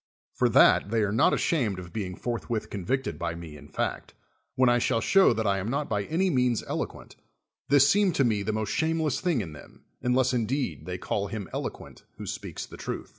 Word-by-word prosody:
For -, -, +2 dB
that -, -, +5 dB
they 110 Hz, 0 st, +1 dB
are 100 Hz, -, 0 dB
not 110 Hz, -, +4 dB
ashamed 120 Hz, -, +1 dB
of 90 Hz, -1 st, -9 dB
being 95 Hz, -4 st, -4 dB
forthwith 115 Hz, 0 st, -3 dB
convicted 130 Hz, +8 st, -2 dB
by 85 Hz, -1 st, -2 dB
me 85 Hz, -3 st, -9 dB
in 75 Hz, 0 st, -12 dB
fact, -, -, -3 dB, 0.4 s
when 130 Hz, 0 st, +4 dB
I 120 Hz, 0 st, +4 dB
shall 115 Hz, -, +1 dB
show 195 Hz, +11 st, +5 dB
that 110 Hz, -1 st, -1 dB
I 100 Hz, -1 st, +2 dB
am 95 Hz, -, -4 dB
not 140 Hz, +4 st, -2 dB
by 105 Hz, -2 st, -1 dB
any 180 Hz, +4 st, +1 dB
means 125 Hz, -4 st, +1 dB
elo -, -, -2 dB
rjuent, -, -, -15 dB, 0.5 s
this 140 Hz, -1 st, +6 dB
seemed 200 Hz, 0 st, +3 dB
to 140 Hz, -, +3 dB
me 110 Hz, -4 st, +1 dB
the 110 Hz, -, -1 dB
most 110 Hz, -1 st, -2 dB
shameless 160 Hz, -3 st, 0 dB
thing 170 Hz, -10 st, +1 dB
in 80 Hz, -6 st, -7 dB
them, 75 Hz, -, -15 dB, 0.2 s
unless 125 Hz, +1 st, +2 dB
indeed 125 Hz, +1 st, -2 dB
they 90 Hz, 0 st, -3 dB
call 100 Hz, +2 st, -2 dB
him 105 Hz, -3 st, -5 dB
elo -, -, -1 dB
quent -, -, -14 dB, 0.2 s
who -, -, -7 dB
speaks -, -, -5 dB
the -, -, -12 dB
truth. -, -, -5 dB
115 Hz, 220 wpm, -27 LUFS, 100-135 Hz, 0.5 s, this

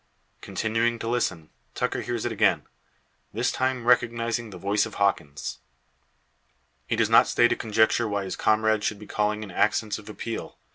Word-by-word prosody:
Continuing 115 Hz, +2 st, 0 dB
to 115 Hz, -, -5 dB
listen, 95 Hz, -10 st, -1 dB, 0.2 s
Tucker -, -, -1 dB
hears 120 Hz, -2 st, -3 dB
it 120 Hz, -, -1 dB
again, 110 Hz, -, +2 dB, 0.7 s
this -, -, 0 dB
time 130 Hz, -2 st, -1 dB
recognising 120 Hz, -1 st, +1 dB
the 95 Hz, -, -9 dB
voice 100 Hz, +4 st, +1 dB
of 110 Hz, -, -11 dB
Hawkins. 75 Hz, -8 st, -1 dB, 1.3 s
He -, -, 0 dB
does -, -, +2 dB
not -, -, +6 dB
stay 120 Hz, -, +4 dB
to -, -, 0 dB
conjecture 110 Hz, +1 st, +2 dB
why 100 Hz, -1 st, -1 dB
his 95 Hz, -1 st, -4 dB
comrade 110 Hz, 0 st, +2 dB
should 105 Hz, -, -1 dB
be 105 Hz, -, -11 dB
calling 105 Hz, +1 st, -1 dB
in 100 Hz, -, -9 dB
accents 105 Hz, +3 st, +1 dB
of 105 Hz, -, -12 dB
appeal. 115 Hz, +1 st, -6 dB
110 Hz, 170 wpm, -26 LUFS, 105-115 Hz, 1.3 s, not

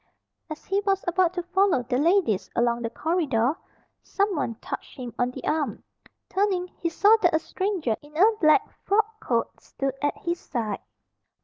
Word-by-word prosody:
As 310 Hz, -1 st, -8 dB
he 390 Hz, +1 st, +1 dB
was 390 Hz, -1 st, 0 dB
about 355 Hz, 0 st, +3 dB
to 355 Hz, -, -2 dB
follow 370 Hz, -5 st, +2 dB
the 250 Hz, +1 st, -1 dB
ladies 330 Hz, -, +2 dB
along 235 Hz, 0 st, +1 dB
the 230 Hz, -, -2 dB
corridor, 295 Hz, -4 st, 0 dB, 0.5 s
someone 365 Hz, -, -1 dB
touched -, -, -7 dB
him 245 Hz, -3 st, -6 dB
on 245 Hz, 0 st, +2 dB
the 250 Hz, -, -9 dB
arm. 305 Hz, -2 st, -1 dB, 0.4 s
Turning, 375 Hz, -2 st, 0 dB
he 335 Hz, -, -3 dB
saw 410 Hz, +6 st, +5 dB
that 350 Hz, -3 st, +4 dB
a -, -, +6 dB
stranger 360 Hz, -, -2 dB
in 295 Hz, +1 st, -13 dB
a 430 Hz, +6 st, +5 dB
black 310 Hz, +5 st, +5 dB, 0.2 s
frock 435 Hz, +2 st, +1 dB
coat 235 Hz, -2 st, -2 dB
stood 270 Hz, -1 st, -3 dB
at 290 Hz, 0 st, 0 dB
his 345 Hz, -3 st, -3 dB
side. 220 Hz, -6 st, -3 dB
330 Hz, 170 wpm, -25 LUFS, 250-390 Hz, 0.5 s, a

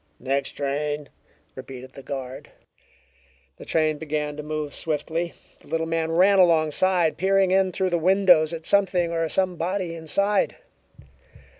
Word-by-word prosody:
"Next 135 Hz, +2 st, -2 dB
train," 145 Hz, +1 st, -3 dB, 0.4 s
repeated 130 Hz, 0 st, -10 dB
the 135 Hz, -, -11 dB
guard. 130 Hz, -1 st, -7 dB, 1.1 s
The -, -, -11 dB
train 155 Hz, -2 st, +1 dB
began 150 Hz, -1 st, -3 dB
to 150 Hz, -, -6 dB
move 150 Hz, -1 st, -4 dB
swiftly. 160 Hz, +2 st, -2 dB, 0.2 s
The -, -, -21 dB
little 165 Hz, 0 st, -1 dB
man 165 Hz, 0 st, -1 dB
ran 190 Hz, +3 st, +5 dB
alongside, 170 Hz, 0 st, +3 dB
peering 195 Hz, 0 st, +2 dB
in 190 Hz, 0 st, +3 dB
through 185 Hz, 0 st, -1 dB
the 170 Hz, -, +1 dB
windows 180 Hz, -3 st, +4 dB
at 165 Hz, -1 st, -6 dB
something 185 Hz, -4 st, +2 dB
or 165 Hz, -1 st, -1 dB
somebody 180 Hz, 0 st, -1 dB
inside. 195 Hz, +5 st, 0 dB
165 Hz, 135 wpm, -24 LUFS, 150-185 Hz, 1.1 s, ran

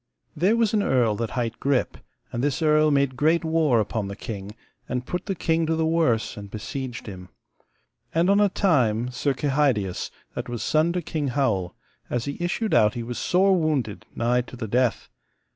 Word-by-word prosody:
There 185 Hz, +8 st, +3 dB
was 230 Hz, -3 st, +2 dB
an 210 Hz, -, +3 dB
earl 125 Hz, -, +2 dB
that 115 Hz, 0 st, -2 dB
hight 115 Hz, -1 st, -2 dB
Grip, 135 Hz, -2 st, 0 dB, 0.4 s
and 120 Hz, -, -3 dB
this 145 Hz, +3 st, 0 dB
earl 155 Hz, 0 st, +4 dB
made 140 Hz, -2 st, +2 dB
great 160 Hz, +5 st, +2 dB
war 160 Hz, -7 st, +3 dB
upon 105 Hz, -1 st, -2 dB
the 100 Hz, -, -6 dB
king, 105 Hz, -1 st, -7 dB, 0.3 s
and 125 Hz, 0 st, -2 dB
put 180 Hz, +6 st, -4 dB
the 195 Hz, -, -1 dB
king 165 Hz, -1 st, 0 dB
to 160 Hz, -, +1 dB
the 160 Hz, 0 st, +1 dB
worse, 160 Hz, -9 st, +1 dB
and 100 Hz, -1 st, -8 dB
besieged 120 Hz, +4 st, -6 dB
him. 90 Hz, -3 st, -9 dB, 0.8 s
And 165 Hz, +2 st, +2 dB
on 200 Hz, +1 st, +4 dB
a 205 Hz, -, +4 dB
time 125 Hz, -, +1 dB
Sir 135 Hz, +2 st, -1 dB
Kehydius, 135 Hz, -, 0 dB, 0.2 s
that -, -, -5 dB
was 120 Hz, -3 st, -4 dB
son 155 Hz, +2 st, +2 dB
to 180 Hz, -1 st, -2 dB
King 150 Hz, -2 st, -2 dB
Howel, 115 Hz, -10 st, 0 dB, 0.3 s
as 120 Hz, -1 st, -1 dB
he 140 Hz, -, -4 dB
issued 215 Hz, +5 st, -1 dB
out 105 Hz, -1 st, +4 dB
he 120 Hz, -, -3 dB
was 120 Hz, +1 st, -5 dB
sore 190 Hz, +2 st, +3 dB
wounded, 145 Hz, -, -1 dB
nigh 120 Hz, +1 st, +2 dB
to 125 Hz, -, -11 dB
the 115 Hz, -2 st, -5 dB
death. 125 Hz, +2 st, +1 dB
135 Hz, 195 wpm, -24 LUFS, 115-160 Hz, 0.8 s, earl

